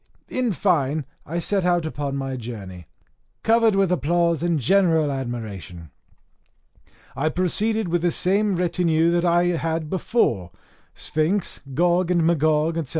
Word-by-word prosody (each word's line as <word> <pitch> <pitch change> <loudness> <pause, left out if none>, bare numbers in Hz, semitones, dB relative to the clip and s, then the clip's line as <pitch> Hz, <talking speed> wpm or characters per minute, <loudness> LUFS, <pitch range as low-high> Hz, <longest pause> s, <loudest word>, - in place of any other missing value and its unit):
In 255 -3 -1
fine, 155 -6 0 0.2
I 165 - -3
set 190 +3 0
out 175 -2 +1
upon 145 -3 -3
my 135 -1 -3
journey, 100 -8 -8 0.6
covered 225 -2 +3
with 195 -2 +2
applause 170 -1 +1
and 170 -2 +1
general 160 - +3
admiration. 105 - -6 1.2
I 140 +4 0
proceeded 210 +5 0
with 175 0 0
the 175 - +2
same 195 +4 +1
retinue 170 -2 +1
that 175 0 +1
I 175 0 +3
had 160 -1 -3
before 145 - 0 0.5
Sphinx, 165 +5 -1
Gog 175 +2 +2
and 175 -2 +2
Magog, 160 0 +1
&c. 135 - -12
165 Hz, 135 wpm, -23 LUFS, 140-180 Hz, 1.2 s, covered